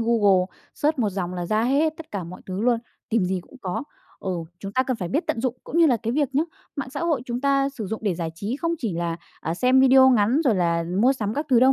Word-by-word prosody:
Google 205 Hz, -5 st, +3 dB, 0.3 s
search 300 Hz, -1 st, 0 dB
1 220 Hz, -4 st, +2 dB
dòng 180 Hz, -1 st, -3 dB
là 175 Hz, -1 st, -3 dB
ra 215 Hz, +3 st, +1 dB
hết 295 Hz, +5 st, +2 dB
tất 325 Hz, -, -11 dB
cả 195 Hz, -4 st, -4 dB
mọi 180 Hz, +2 st, -9 dB
thứ 190 Hz, +1 st, -4 dB
luôn, 240 Hz, 0 st, +3 dB, 0.3 s
tìm 220 Hz, -4 st, +2 dB
gì 185 Hz, 0 st, -1 dB
cũng 265 Hz, -, -17 dB
có 185 Hz, +6 st, -2 dB, 0.4 s
ừ, 190 Hz, -, -1 dB, 0.3 s
chúng 195 Hz, 0 st, -6 dB
ta 260 Hz, -, +3 dB
cần 255 Hz, -2 st, -2 dB
phải 180 Hz, -4 st, -4 dB
biết 300 Hz, -, -1 dB
tận 225 Hz, -, -1 dB
dụng 255 Hz, -1 st, -1 dB
cũng 335 Hz, -, -2 dB
như 330 Hz, -, +7 dB
là 250 Hz, -5 st, +4 dB
cái 230 Hz, +1 st, -3 dB
việc 280 Hz, -2 st, 0 dB
nhé, 305 Hz, +4 st, +3 dB, 0.3 s
mạng 270 Hz, -2 st, -4 dB
xã 285 Hz, -, -5 dB
hội 320 Hz, -7 st, 0 dB
chúng 240 Hz, 0 st, -3 dB
ta 275 Hz, 0 st, +2 dB
sử 230 Hz, -7 st, -6 dB
dụng 220 Hz, +3 st, -4 dB
để 195 Hz, -, +1 dB
giải 165 Hz, -1 st, -3 dB
trí 205 Hz, +9 st, -3 dB
không 335 Hz, +1 st, -1 dB
chỉ 220 Hz, -7 st, -2 dB
là, 170 Hz, -1 st, -2 dB, 0.2 s
ờ, 165 Hz, +2 st, -2 dB
xem 255 Hz, +6 st, +4 dB
video 265 Hz, 0 st, +7 dB
ngắn 240 Hz, +5 st, +3 dB
rồi 235 Hz, -6 st, +4 dB
là 170 Hz, -2 st, +1 dB, 0.2 s
mua 260 Hz, +2 st, +6 dB
sắm 215 Hz, -5 st, -3 dB
các 295 Hz, +2 st, -2 dB
thứ 245 Hz, -2 st, +6 dB
đâu 265 Hz, +1 st, +6 dB
235 Hz, 275 wpm, -24 LUFS, 190-270 Hz, 0.4 s, như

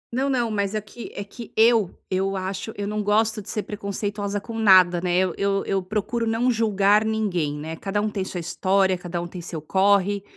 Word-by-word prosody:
Não, 270 Hz, +2 st, +1 dB
não, 240 Hz, -4 st, 0 dB
mas 200 Hz, 0 st, -1 dB
é 215 Hz, -, +1 dB
que 220 Hz, +3 st, -10 dB
é 200 Hz, -, -4 dB
que 225 Hz, +3 st, -11 dB
eu 225 Hz, -4 st, +5 dB, 0.2 s
eu 195 Hz, +1 st, 0 dB
acho 190 Hz, +3 st, -4 dB
eu 205 Hz, 0 st, -3 dB
não 210 Hz, 0 st, -2 dB
gosto 215 Hz, +1 st, +1 dB
de 195 Hz, -, -11 dB
ser 210 Hz, -, -2 dB
preconceituosa 205 Hz, 0 st, -3 dB
com 225 Hz, +2 st, -7 dB
nada, 185 Hz, -4 st, +6 dB
né, 180 Hz, -1 st, +1 dB
eu 185 Hz, -2 st, +2 dB
eu 200 Hz, 0 st, 0 dB
eu 195 Hz, -1 st, 0 dB
procuro 215 Hz, +4 st, -2 dB
não 235 Hz, +3 st, +2 dB
julgar 210 Hz, -2 st, +3 dB
ninguém, 185 Hz, -9 st, -1 dB
né, 160 Hz, +2 st, -5 dB
cada 195 Hz, +4 st, -2 dB
um 210 Hz, -, 0 dB
tem 195 Hz, -2 st, -2 dB
sua 180 Hz, -1 st, -5 dB
história, 190 Hz, +2 st, +1 dB
cada 175 Hz, -1 st, -5 dB
um 175 Hz, -, -4 dB
tem 180 Hz, 0 st, -8 dB
seu 165 Hz, -2 st, -6 dB
corre 200 Hz, +4 st, +2 dB
200 Hz, 215 wpm, -24 LUFS, 185-215 Hz, 0.2 s, nada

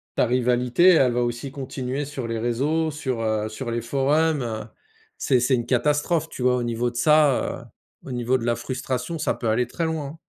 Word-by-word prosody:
ta -, -, +2 dB
rivalité, 125 Hz, +7 st, +3 dB
elle 135 Hz, -8 st, +5 dB
va 125 Hz, -, +1 dB
aussi 120 Hz, +3 st, -3 dB
continuer 135 Hz, 0 st, -4 dB
sur 135 Hz, -4 st, -5 dB
les 115 Hz, 0 st, -2 dB
réseaux, 140 Hz, +8 st, 0 dB
sur, 130 Hz, -6 st, -3 dB
heu, 110 Hz, -1 st, -1 dB
sur 120 Hz, +2 st, -5 dB
les 120 Hz, 0 st, -1 dB
forums, 140 Hz, +4 st, +1 dB
heu. 110 Hz, -2 st, -4 dB, 0.5 s
C'est 130 Hz, -3 st, +2 dB
c'est 130 Hz, +2 st, +2 dB
une 120 Hz, -1 st, -2 dB
catastrophe, 150 Hz, +6 st, +1 dB
tu 125 Hz, -, -6 dB
vois? 125 Hz, 0 st, +4 dB
Au 125 Hz, -, -1 dB
niveau 120 Hz, +1 st, -1 dB
de -, -, -21 dB
ça, 150 Hz, 0 st, +3 dB
heu, -, -, -16 dB, 0.4 s
au -, -, -5 dB
niveau 125 Hz, +1 st, +1 dB
de 115 Hz, -, -5 dB
la 120 Hz, -1 st, +1 dB
frustration, 130 Hz, +5 st, -4 dB
ça -, -, 0 dB
peut 115 Hz, -, -3 dB
aller 125 Hz, +3 st, +2 dB
très 165 Hz, +7 st, -3 dB
loin, 160 Hz, -3 st, -2 dB
hein. 150 Hz, +4 st, -9 dB
125 Hz, 215 wpm, -24 LUFS, 120-145 Hz, 0.5 s, elle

